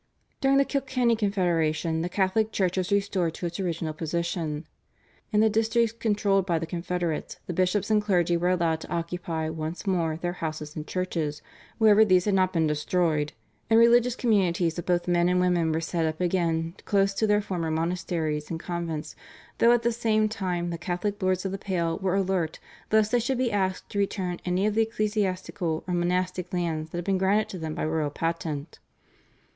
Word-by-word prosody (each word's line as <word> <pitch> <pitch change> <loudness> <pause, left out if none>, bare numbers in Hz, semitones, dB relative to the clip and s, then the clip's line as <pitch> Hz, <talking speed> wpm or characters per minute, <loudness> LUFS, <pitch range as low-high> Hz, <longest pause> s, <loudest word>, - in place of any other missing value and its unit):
During 275 0 +3
the 275 - +4
Kilkenny 260 -4 +1
Confederation 170 -6 0
the 175 - -2
Catholic 205 +4 +1
Church 185 -4 0
was 185 +1 -1
restored 195 -4 +1
to - - -5
its 170 +1 -4
original 165 -4 -2
position. 165 -1 -3 0.7
In 210 -1 +3
the 220 - +5
districts 225 +1 +2
controlled 205 -3 +1
by 175 -3 0
the 165 - -2
Confederates 175 -1 -3
the 180 - -4
bishops 185 +4 +1
and 210 -1 +4
clergy 175 -4 +2
were 175 +1 +1
allowed 170 -3 +1
to - - -9
occupy 170 -1 -3
once 160 +4 -5
more 170 -5 0
their 175 +1 -3
houses 155 -3 -5
and 155 -1 -6
churches 165 -5 -2 0.3
wherever 220 -1 +6
these 185 -4 +4
had 205 - +1
not 185 -1 +3
been 165 -3 +1
destroyed, 150 0 0 0.4
and 225 0 +6
religious 240 +1 +5
communities 185 -8 +1
of 175 - -7
both 175 -1 +1
men 175 0 +3
and 180 0 +2
women 175 -3 +2
were 160 - 0
set 165 0 -1
up 155 0 -3
again 170 -2 0
close 195 -1 +2
to 220 +2 +1
their 210 0 +4
former 180 -5 -3
monasteries 160 -2 -2
and 165 - -3
convents, 170 -3 -4 0.4
though 235 - +6
at 240 -1 +3
the 235 - +2
same 220 -2 +2
time 180 -5 -2
the 170 - -4
Catholic 195 +4 -3
Lords 185 0 +1
of 190 - -1
the 195 - -4
Pale 170 -3 -1
were 190 -1 0
alert 185 -4 0 0.3
lest 215 -1 +3
they 245 - +3
should 255 +2 -1
be 250 -2 +1
asked 190 -2 -1
to 200 - -2
return 185 -3 -1
any 180 +2 +1
of 215 - +1
the 225 - +3
ecclesiastical 195 -6 -1
or 180 - -1
monastic 180 +1 -1
lands 165 -3 -2
that 170 - -6
had 175 - -4
been 195 -2 +1
granted 200 +3 +2
to 185 - -6
them 160 -1 -4
by - - -2
royal 155 -1 0
patent. 160 -1 -3
180 Hz, 195 wpm, -26 LUFS, 165-205 Hz, 0.7 s, wherever